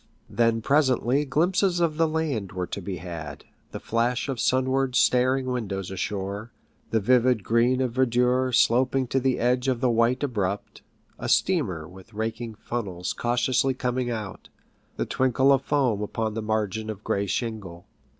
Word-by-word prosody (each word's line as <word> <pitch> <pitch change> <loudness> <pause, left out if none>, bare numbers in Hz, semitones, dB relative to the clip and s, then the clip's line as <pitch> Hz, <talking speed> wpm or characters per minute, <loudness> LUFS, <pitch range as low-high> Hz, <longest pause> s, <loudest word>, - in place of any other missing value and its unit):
Then 115 -1 +1
presently 135 0 +2
glimpses 175 +6 +1
of 165 -3 +1
the 165 0 +3
land 150 - -2
were 90 -1 -2
to 100 - -6
be 90 0 -5
had, 80 -4 -8 0.3
the - - -6
flash 120 +3 -1
of 130 -3 -3
sunward 130 +2 +1
staring 130 +3 +3
windows 100 -7 -3
ashore, 100 +3 -4 0.4
the 110 - +2
vivid 125 0 +3
green 120 +4 +2
of 130 -2 0
verdure 125 +1 +2
sloping 130 +2 +3
to 135 - +1
the 130 -1 +1
edge 125 +2 +1
of 130 -3 +1
the 125 -1 +2
white 115 +4 +2
abrupt, 100 -7 -3 0.4
a - - -4
steamer 100 - +1
with 95 +5 -15
raking 110 +1 -4
funnels 95 -6 -4
cautiously 125 +2 +1
coming 125 0 -1
out, 110 -5 -6 0.5
the - - -1
twinkle 130 +1 +2
of 135 - +4
foam 130 -8 +1
upon 110 +1 -2
the 110 - -3
margin 110 0 -2
of 105 -1 -6
gray 100 0 -1
shingle. 100 -6 -4
120 Hz, 160 wpm, -25 LUFS, 105-130 Hz, 0.5 s, of